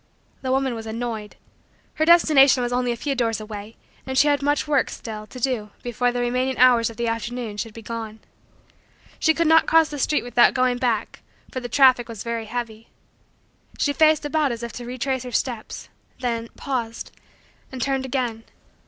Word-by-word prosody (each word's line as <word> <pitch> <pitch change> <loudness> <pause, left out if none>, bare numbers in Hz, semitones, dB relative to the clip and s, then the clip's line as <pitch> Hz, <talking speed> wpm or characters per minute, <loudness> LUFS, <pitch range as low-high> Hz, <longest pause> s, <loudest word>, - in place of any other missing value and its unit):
The 260 - -3
woman 265 -1 +1
was 225 -1 -7
annoyed. 220 -2 -5 0.6
Her 315 - 0
destination 290 -6 +6
was 245 0 -2
only 250 0 0
a - - -2
few 275 +4 -2
doors 230 -4 0
away 215 0 -8 0.3
and 265 0 -3
she 290 - +5
had 285 -1 +2
much 290 +2 0
work, 285 -3 +2
still, 215 -2 -7
to 255 - -10
do 240 -4 -1
before 245 +1 0
the 245 0 -2
remaining 255 +2 0
hours 245 -2 +5
of 225 - -12
the 235 -1 -1
afternoon 230 -1 -4
should 220 0 -5
be 225 - -10
gone. 225 -1 -6 1.0
She 320 -1 +3
could 335 - +1
not 320 +1 +5
cross 325 -1 +4
the 290 - -6
street 300 +3 +1
without 240 0 +4
going 255 -1 +1
back 235 -4 -1 0.3
for 255 - -3
the 245 -1 -7
traffic 255 -1 +4
was 225 -3 -7
very 230 -1 -3
heavy. 230 -1 -6 0.9
She 285 - +1
faced 310 +1 +4
about 295 -2 +1
as 235 0 -5
if 235 -2 -6
to 245 - -7
retrace 255 +1 -2
her 250 0 -7
steps, 240 -3 -3 0.3
then, 230 -2 -2
paused 235 -4 -4 0.6
and 260 - -7
turned 270 +1 0
again. 240 -4 -2
245 Hz, 190 wpm, -23 LUFS, 230-270 Hz, 1.0 s, destination